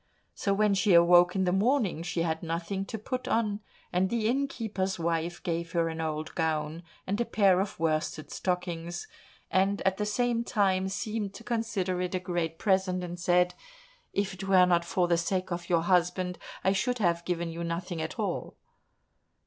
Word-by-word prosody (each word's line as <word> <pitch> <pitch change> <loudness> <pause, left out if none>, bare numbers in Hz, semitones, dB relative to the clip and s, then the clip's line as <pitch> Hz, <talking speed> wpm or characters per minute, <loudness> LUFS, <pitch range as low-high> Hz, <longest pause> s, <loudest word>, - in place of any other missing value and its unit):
So 200 - -1
when 205 +1 +3
she 195 -1 +4
awoke 175 +1 +6
in 190 - +2
the 180 - +2
morning, 210 - +2
she 170 0 -1
had 160 -1 -1
nothing 170 +4 -3
to 225 - -5
put 255 +4 -4
on, 215 -3 +1 0.3
and 185 +1 +2
the 225 -1 0
innkeeper's 225 -7 -1
wife 170 0 -2
gave 170 -1 -2
her 165 -1 +2
an 160 0 -4
old 155 -1 -3
gown 160 0 -1 0.2
and 200 +4 -1
a - - +4
pair 195 -5 +4
of 200 -3 -4
worsted 155 -1 -1
stockings, 180 - -3 0.4
and 195 +2 +2
at 190 0 +1
the 210 - -1
same 235 +2 +1
time 190 -4 +1
seemed 205 0 -3
to 230 - -10
consider 210 -6 -1
it 180 0 -2
a - - +1
great 175 -3 -2
present, 190 -2 +1
and 175 0 -6
said, 180 0 +3 0.6
"If 200 -1 -1
it 190 +1 -7
were 190 -2 +6
not 175 -1 +3
for 175 0 +1
the 170 -1 +3
sake 185 +2 -1
of 175 +1 -4
your 170 -2 +3
husband 180 0 +1 0.2
I 190 - +4
should 240 +6 0
have 170 -5 +1
given 170 -1 -2
you 170 +1 -5
nothing 170 0 -3
at 160 - -5
all!" - - -3
180 Hz, 185 wpm, -29 LUFS, 170-200 Hz, 0.6 s, awoke